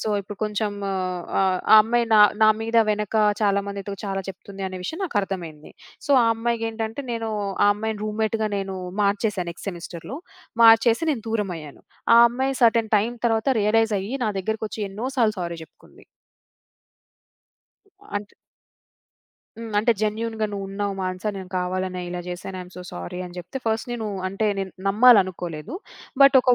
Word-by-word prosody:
So, -, -, -2 dB
ఇప్పుడు 200 Hz, +1 st, -9 dB
కొంచెం 210 Hz, 0 st, -1 dB, 0.7 s
ఆహ్, 185 Hz, -1 st, +2 dB
ఆ -, -, +11 dB
అమ్మాయి 235 Hz, +2 st, +1 dB
నా 215 Hz, -, +7 dB, 0.2 s
నా 215 Hz, -, +7 dB
మీద 230 Hz, +1 st, -1 dB
వెనక 210 Hz, 0 st, -2 dB, 0.3 s
చాలా 200 Hz, -1 st, +3 dB
మందితో 200 Hz, 0 st, -5 dB
చాలా 195 Hz, -1 st, -2 dB
చెప్తుంది 195 Hz, +1 st, -8 dB
అనే 185 Hz, -, -7 dB
విషయం 320 Hz, -, -5 dB
నాకు 285 Hz, -, -4 dB
అర్థమైంది. 170 Hz, -6 st, -6 dB, 0.4 s
సో, -, -, -4 dB
ఆ -, -, +3 dB
అమ్మాయికి 230 Hz, 0 st, -1 dB
ఏంటంటే, 225 Hz, +3 st, -4 dB
నేను 225 Hz, -1 st, -3 dB, 0.4 s
ఆ -, -, +6 dB
అమ్మాయిని 220 Hz, 0 st, -4 dB
రూమ్‌మేట్‌గా 220 Hz, 0 st, -1 dB
నేను 195 Hz, -1 st, -3 dB, 0.3 s
మార్చేసాను 200 Hz, -3 st, 0 dB
నెక్స్ట్ 170 Hz, +4 st, -8 dB
సెమిస్టర్‌లో. 175 Hz, -, -8 dB, 0.5 s
మార్చేసి 225 Hz, +7 st, +6 dB
నేను 240 Hz, -7 st, -2 dB
దూరమయ్యాను. 180 Hz, -10 st, -4 dB, 0.3 s
ఆ -, -, +8 dB
అమ్మాయి 265 Hz, +3 st, -1 dB
సెర్టైన్ 230 Hz, -1 st, +4 dB
టైమ్ 225 Hz, +4 st, 0 dB
తర్వాత 225 Hz, +2 st, +1 dB
రియలైజ్ 220 Hz, +1 st, +2 dB
అయ్యి 200 Hz, +6 st, -6 dB
నా 215 Hz, -, +1 dB
దగ్గరకి 220 Hz, +3 st, -3 dB
వచ్చి 215 Hz, -, -5 dB
ఎన్నో 220 Hz, +6 st, -5 dB
సార్లు 220 Hz, -3 st, +3 dB
సారీ 170 Hz, -1 st, -4 dB
చెప్పుకుంది. -, -, -21 dB, 2.1 s
అంటే 205 Hz, 0 st, -7 dB, 1.2 s
హ్మ్. 225 Hz, -2 st, -7 dB
అంటే 230 Hz, +3 st, +3 dB
"జెన్యూన్‌గా 220 Hz, 0 st, -1 dB
నువ్వు 200 Hz, -1 st, -4 dB
ఉన్నావు 200 Hz, 0 st, -3 dB
మానస 185 Hz, +1 st, -4 dB
నేను 190 Hz, -1 st, -7 dB
కావాలనే 185 Hz, 0 st, -2 dB
ఇలా 175 Hz, 0 st, -4 dB
జేశాను, 185 Hz, +1 st, -6 dB
ఐ -, -, -5 dB
యం 180 Hz, -, -13 dB
సో 180 Hz, -, -7 dB
సారీ" 90 Hz, -, -6 dB
అని 175 Hz, 0 st, -10 dB
జేప్తే, 180 Hz, +9 st, -6 dB
ఫస్ట్ 220 Hz, +1 st, 0 dB
నేను 225 Hz, -2 st, -3 dB, 0.2 s
అంటే 195 Hz, +3 st, -1 dB
నేను 190 Hz, -1 st, -3 dB, 0.2 s
నమ్మాలనుకోలేదు. 195 Hz, -, +3 dB, 0.5 s
బట్ 275 Hz, 0 st, +8 dB
ఒక 250 Hz, -1 st, +4 dB
210 Hz, 160 wpm, -23 LUFS, 190-225 Hz, 2.1 s, ఆ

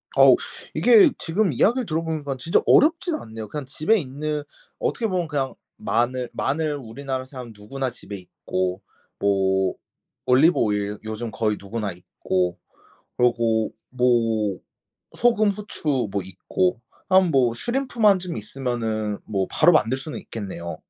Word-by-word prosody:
어우 -, -, +8 dB, 0.4 s
이게 410 Hz, -8 st, +7 dB
지금 185 Hz, +3 st, 0 dB
이야기를 240 Hz, -, +2 dB
들어보니깐 155 Hz, -5 st, -2 dB
진짜 160 Hz, +7 st, +2 dB
어렵진 325 Hz, +2 st, +4 dB
않네요. 110 Hz, -, -7 dB
그냥 145 Hz, +6 st, -5 dB
집에 155 Hz, -, +1 dB
있는 150 Hz, -1 st, -3 dB, 0.4 s
어떻게 460 Hz, -, -1 dB
보면 180 Hz, -4 st, -1 dB
그냥 140 Hz, -3 st, -2 dB, 0.2 s
마늘 125 Hz, +1 st, 0 dB
마늘 150 Hz, +2 st, -1 dB
우리나라 130 Hz, +1 st, -5 dB
사람 130 Hz, -3 st, -9 dB
누구나 130 Hz, +6 st, -4 dB
집에 115 Hz, -4 st, -9 dB
있고 95 Hz, 0 st, -3 dB, 0.4 s
뭐 95 Hz, -1 st, +2 dB, 0.5 s
올리브 135 Hz, +7 st, +5 dB
오일 105 Hz, -1 st, 0 dB
요즘 110 Hz, +1 st, -5 dB
거의 105 Hz, 0 st, 0 dB
누구나 105 Hz, 0 st, -4 dB
있고 90 Hz, 0 st, -2 dB, 0.6 s
그러고 115 Hz, -3 st, +2 dB, 0.2 s
뭐 115 Hz, -5 st, +1 dB, 0.6 s
소금 220 Hz, -3 st, +3 dB
후추 155 Hz, -, -2 dB
뭐 100 Hz, -, -1 dB
있고 125 Hz, -, -1 dB, 0.3 s
한 190 Hz, -1 st, +5 dB
뭐 130 Hz, -5 st, +3 dB
슈림프만 235 Hz, -, +2 dB
좀 180 Hz, -2 st, -5 dB
있으면은 110 Hz, -3 st, -3 dB
뭐 100 Hz, -3 st, -1 dB
바로 175 Hz, -, +5 dB
만들 130 Hz, -6 st, +3 dB
수는 135 Hz, +3 st, -6 dB
있겠네요. 95 Hz, -6 st, -6 dB
130 Hz, 290 characters per minute, -23 LUFS, 110-165 Hz, 0.6 s, 어우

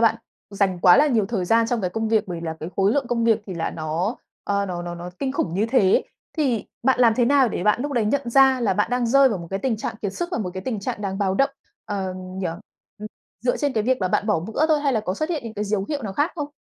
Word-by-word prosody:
bạn 225 Hz, -1 st, +4 dB, 0.4 s
dành 195 Hz, -3 st, 0 dB
quá 180 Hz, +3 st, +7 dB
là 295 Hz, -, +5 dB
nhiều 230 Hz, -8 st, +2 dB
thời 200 Hz, -4 st, -2 dB
gian 225 Hz, +5 st, +3 dB
trong 235 Hz, 0 st, -1 dB
cái 185 Hz, -3 st, -1 dB
công 225 Hz, +3 st, -2 dB
việc. 220 Hz, -1 st, +2 dB
Bởi 175 Hz, -2 st, -4 dB
vì -, -, -7 dB
là 160 Hz, -, -4 dB
cái 160 Hz, -, -5 dB
khối 195 Hz, +2 st, +3 dB
lượng 280 Hz, -1 st, 0 dB
công 235 Hz, -1 st, 0 dB
việc 225 Hz, -1 st, +3 dB
thì 190 Hz, -, -6 dB
là 165 Hz, -1 st, -2 dB
nó, 165 Hz, +7 st, -2 dB, 0.3 s
ờ, 200 Hz, 0 st, 0 dB
nó 175 Hz, -2 st, -4 dB
nó 175 Hz, 0 st, -5 dB
nó 175 Hz, +1 st, -7 dB
kinh 270 Hz, -1 st, -2 dB
khủng 170 Hz, -11 st, -2 dB
như 210 Hz, +4 st, +1 dB
thế. 205 Hz, -7 st, +4 dB, 0.3 s
Thì 260 Hz, -9 st, 0 dB, 0.2 s
bạn 260 Hz, 0 st, +2 dB
làm 230 Hz, -3 st, +5 dB
thế 240 Hz, +1 st, +2 dB
nào 270 Hz, -1 st, +4 dB
để 190 Hz, -, -3 dB
bạn 210 Hz, +3 st, +2 dB
lúc 290 Hz, 0 st, -3 dB
đấy 235 Hz, -4 st, +1 dB
nhận 240 Hz, +2 st, -1 dB
ra 265 Hz, 0 st, +5 dB
là 205 Hz, -5 st, +1 dB
bạn 210 Hz, +4 st, 0 dB
đang 245 Hz, -1 st, +1 dB
rơi 275 Hz, +3 st, +5 dB
vào 210 Hz, -7 st, -2 dB
một 170 Hz, -, -8 dB
cái 195 Hz, -, -2 dB
tình 245 Hz, 0 st, -1 dB
trạng 215 Hz, -, -4 dB
kiệt 200 Hz, -, -2 dB
sức 345 Hz, +10 st, -3 dB
và -, -, 0 dB
một 185 Hz, -4 st, -3 dB
cái 185 Hz, -, -4 dB
tình 220 Hz, -1 st, -3 dB
trạng 200 Hz, -, -4 dB
đáng 195 Hz, -1 st, -3 dB
báo 195 Hz, -2 st, +1 dB
động, 275 Hz, +7 st, +2 dB, 0.3 s
ờ, 190 Hz, -2 st, -3 dB
nhỉ? 185 Hz, 0 st, -5 dB, 0.5 s
Ừm, 210 Hz, -, -6 dB, 0.3 s
dựa 245 Hz, +1 st, +1 dB
trên 285 Hz, -2 st, -1 dB
cái 220 Hz, -, 0 dB
việc 255 Hz, +2 st, +1 dB
là 185 Hz, -, +1 dB
bạn 200 Hz, -, 0 dB
bỏ 210 Hz, -7 st, +2 dB
bữa 225 Hz, -, 0 dB
thôi 305 Hz, -2 st, +2 dB
hay 280 Hz, -2 st, +1 dB
là 220 Hz, -, +1 dB
có 185 Hz, -3 st, -3 dB
xuất 310 Hz, +9 st, -2 dB
hiện 300 Hz, -7 st, -2 dB
những 225 Hz, -1 st, -7 dB
cái 210 Hz, 0 st, -2 dB
dấu 200 Hz, -1 st, -1 dB
hiệu 290 Hz, -4 st, -3 dB
nào 200 Hz, -, -4 dB
khác 290 Hz, -, +1 dB
không? 295 Hz, -4 st, -4 dB
220 Hz, 305 wpm, -23 LUFS, 190-255 Hz, 0.5 s, quá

